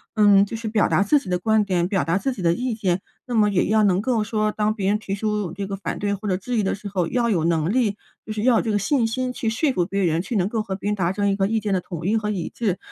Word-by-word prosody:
嗯， 205 -2 +6
就 225 - -6
是 225 0 -5
表 215 -1 +2
达 - - +3
自 290 +9 +4
己 190 - -10
的 180 -1 0
观 220 +2 +2
点、 180 -3 0
表 195 -2 0
达 165 +3 +1
自 260 +6 -1
己 200 - -8
的 170 -1 +3
意 250 +4 -2
见， 190 -4 -1 0.2
那 245 - -5
么 210 -1 +4
也 190 -3 +1
要 215 0 +3
能 190 -1 +3
够 230 -2 0
说 215 0 0
当 215 0 0
别 195 -3 -2
人 210 +1 +1
提 195 -2 -4
出 210 -4 -2
这 200 +1 -4
个 200 - -3
反 195 - -4
对 200 0 0
或 200 +1 -5
者 185 -1 +1
质 240 +5 -3
疑 210 - +2
的 195 - 0
时 205 +1 -9
候， 180 -4 -1
要 240 -2 0
有 170 -7 +1
能 165 +1 +1
力 225 -6 +1 0.3
就 220 - -6
是 215 0 -3
要 245 -3 +4
有 - - +2
这 225 - -2
个 205 - +2
信 235 +4 +1
心 255 +2 -2
去 225 - -2
说 270 +6 +1
服 175 -5 +1
别 195 +1 -1
人， 165 0 +1
去 230 +4 -5
能 190 -1 +2
够 220 -1 -1
和 195 -3 -4
别 205 +1 -3
人 210 - 0
达 180 -2 0
成 200 0 0
一 195 - +1
个 195 -1 +1
意 225 +1 0
见 205 -1 -2
的 185 - +1
统 170 -2 -7
一 215 +3 +2
和 210 -1 -2
一 190 -5 -3
致。 200 -6 -1
205 Hz, 350 characters per minute, -23 LUFS, 190-220 Hz, 0.3 s, 嗯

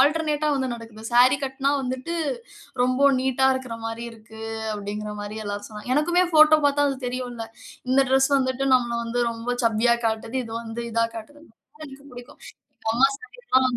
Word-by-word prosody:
ஆல்டர்னேட்டா 300 +1 +2
வந்து 265 -1 -1
நடக்குது. 230 -2 -9
"சாரி 250 +3 +6
கட்டினா 270 +1 -1
வந்துட்டு, 260 +4 -4 0.7
ரொம்ப 255 +3 +3
நீட்டா 265 0 +2
இருக்கிற 260 -3 -4
மாரி 225 +1 -4
இருக்கு." 220 0 -13 0.3
அப்படீங்கிற 210 0 -5
மாரி 205 +1 -6
எல்லாரும் 205 0 -4
சொன்னாங்க. 215 +2 -8
எனக்குமே 345 +5 +3
ஃபோட்டோ 310 0 +7
பார்த்தா 285 0 +3
அது 275 - -2
தெரியும்ல்ல. 245 -2 -4 0.4
இந்த 265 +1 +5
டிரெஸ் 265 +1 +4
வந்துட்டு 260 0 0
நம்மள 240 -2 +1
வந்து 235 +1 -2
ரொம்ப 235 +2 -3
சப்பியா 230 +1 +3
காட்டுது. 225 +2 -2
இது 225 - -9
வந்து 230 +1 -6
இதா 230 0 +2
காட்டுதுன்னு. 290 +6 -11 0.3
எனக்கு 295 -3 -8
இது 280 +1 -17
புடிக்கும். 245 0 -12 0.4
எங்க 220 - -2
அம்மா 265 +3 +5
சாரியல்லாம் 260 - 0
255 Hz, 165 wpm, -24 LUFS, 230-275 Hz, 0.7 s, ஃபோட்டோ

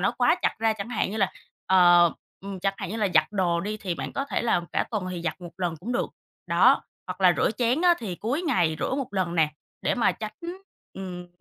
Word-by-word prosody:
nó 195 - +2
quá 245 -1 +5
chặt - - +2
ra, 225 0 +2
chẳng 215 0 -6
hạn 230 -5 -1
như 215 - -4
là, 195 -3 +2 0.4
ờ, 175 -2 +6 0.3
ừm, 195 -1 -7
chẳng 195 0 0
hạn - - -5
như 220 - -3
là 210 -3 +1
giặt 155 0 +6
đồ 175 -4 +1
đi 210 +4 -3
thì 190 -4 -3
bạn - - -5
có 275 - -2
thể - - -2
là 225 -7 +2
cả - - +1
tuần 215 -5 -2
thì 175 -2 -5
giặt 170 - -3
1 175 -1 -9
lần 175 -3 -1
cũng 235 +7 -4
được, 240 - 0 0.4
đó, - - +5 0.2
hoặc 180 +1 -6
là 180 -2 +6
rửa - - +2
chén 250 +5 +1
á, 350 -1 +6
thì 210 -7 -4
cuối 250 - -2
ngày 175 - +1
rửa - - -1
1 270 -2 -2
lần 180 -3 0
nè, 160 -3 +3 0.3
để - - +1
mà 245 - +2
tránh, 215 -1 -6 0.6
ừm, 180 -2 -7
195 Hz, 245 wpm, -26 LUFS, 175-225 Hz, 0.6 s, ờ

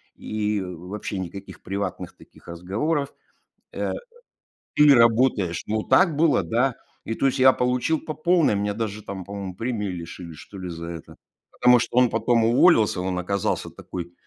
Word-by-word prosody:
и 105 -1 -2
вообще 95 +2 -6
никаких 95 +2 -8
приватных 100 -1 -5
таких - - -19
разговоров, 110 - -2 0.6
э, - - -2 0.8
или 150 -1 +7
работаешь". 115 -7 +3
Ну, 110 0 -1
так 175 -6 +4
было, 155 -1 +3
да. 125 +2 0 0.3
И, 115 - -3
то - - -1
есть, 135 +1 0
я 130 0 +8
получил 125 +6 0
по 155 - -6
полной. 170 - +2
Меня 105 0 -1
даже 105 -1 -4
там, 95 -1 -6
по-моему, 100 -2 -6
премии 115 -3 -3
лишили, 85 -1 -7
что 100 +6 -12
ли, 90 -1 -6
за 85 0 -7
это. 85 -2 -9 0.4
Потому 125 0 +5
что 120 - -3
он 125 -2 +5
потом 115 +1 +1
уволился, 115 - +4
он 90 -1 -2
оказался 100 +2 -2
такой, 85 -1 -8
105 Hz, 160 wpm, -24 LUFS, 95-125 Hz, 0.8 s, я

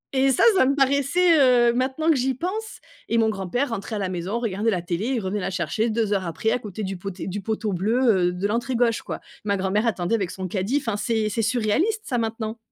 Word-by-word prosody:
Et 265 +1 +4
ça 260 - +2
ça 260 - +4
me 275 - +2
paraissait, 280 +5 +3 0.3
heu, - - +2
maintenant 260 +6 -1
que - - +3
j'y 260 +1 0
pense 420 - -5 0.3
et 230 - +2
mon 225 -1 +3
grand-père 215 +7 -2
rentrait 220 -1 -4
à - - -2
la 195 -2 -2
maison, 185 +5 -3
regardait 220 -1 -1
la 180 -5 -1
télé 175 +5 -2
et - - 0
revenait 200 0 -2
la 190 - -2
chercher 200 +5 -1
2 220 -2 0
heures 190 -3 -1
après 170 +7 -1
à 250 - +1
côté 210 -2 -6
du 190 -1 -4
poté 195 +1 -6
du 195 +2 -4
poteau 215 0 -2
bleu, 205 0 +2
heu, - - +1
de 180 +3 -2
l'entrée 235 +4 -1
gauche, 235 -1 +2
quoi. - - -6 0.2
Ma 200 -1 0
grand-mère 195 +4 0
attendait 185 -1 -1
avec 200 -6 0
son 185 0 -5
caddie. 195 +9 -1
Enfin 225 -7 -2
c'est 220 -1 0
c'est 220 +2 -1
surréaliste 245 - +1
ça, 245 -3 -1
maintenant. 225 0 -3
220 Hz, 240 wpm, -24 LUFS, 195-250 Hz, 0.3 s, Et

